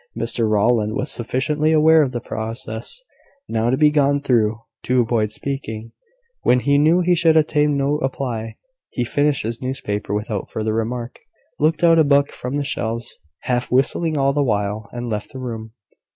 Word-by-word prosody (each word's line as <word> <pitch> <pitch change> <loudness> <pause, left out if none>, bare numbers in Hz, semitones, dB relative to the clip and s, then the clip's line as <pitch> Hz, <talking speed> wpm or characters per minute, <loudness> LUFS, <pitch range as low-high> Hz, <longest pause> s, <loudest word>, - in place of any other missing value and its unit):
Mr 115 -2 -1
Rowland 110 0 +2
was - - -1
sufficiently 150 +6 0
aware 160 0 +6
of 135 -4 0
the 120 - -3
process 110 - -6 0.4
now 115 +1 0
to 130 - +1
be 150 0 +5
gone 145 -1 +2
through, 115 -6 +1 0.2
to 125 0 +1
avoid 115 -2 +1
speaking, 115 -2 -5 0.5
when 125 - +3
he 140 +1 +3
knew 160 +4 +4
he 180 0 +3
should 165 -2 +4
obtain 150 -2 +2
no 140 +2 0
reply. 120 -6 -3 0.3
He 125 - -2
finished 145 +3 0
his 115 +1 -4
newspaper 125 -7 -3
without 105 -1 -3
further 110 0 -2
remark, 115 +2 -3 0.4
looked 155 +2 +1
out 165 -1 +6
a - - +6
book 140 -1 +3
from 125 +3 -5
the 145 - 0
shelves, 115 -3 -4 0.2
half 125 0 -2
whistling 150 +5 +1
all 140 0 +2
the 145 - +1
while, 105 -4 -1
and 120 0 -5
left 105 -2 -4
the 130 - -7
room. 110 -3 -6
125 Hz, 175 wpm, -21 LUFS, 110-145 Hz, 0.5 s, aware